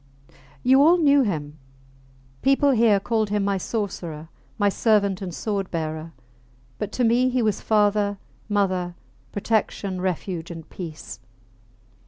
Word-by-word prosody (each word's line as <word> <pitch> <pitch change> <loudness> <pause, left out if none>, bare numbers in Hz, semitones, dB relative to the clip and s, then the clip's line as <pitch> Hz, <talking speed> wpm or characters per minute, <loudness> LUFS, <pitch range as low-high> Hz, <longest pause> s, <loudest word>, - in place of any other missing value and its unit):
You 265 +2 +5
all 330 +5 +6
knew 285 -4 +5
him. 155 - -3 0.8
People 275 +1 +4
here 225 -5 +4
called 220 +1 0
him 205 -1 0
my 200 -1 0
sorcerer, 170 -7 -4 0.3
my 205 -2 +2
servant 200 -2 +2
and 185 -2 -4
sword 195 +1 -3
bearer; 160 -1 -4 0.7
but 210 -1 -3
to 250 - 0
me 240 +2 +3
he 250 -1 0
was 215 -2 0
father, 205 -1 +2 0.3
mother, 185 -4 0 0.4
protection, 200 -3 -1
refuge 180 -2 -3
and 165 -2 -8
peace. 155 - -8
200 Hz, 130 wpm, -24 LUFS, 180-225 Hz, 0.8 s, all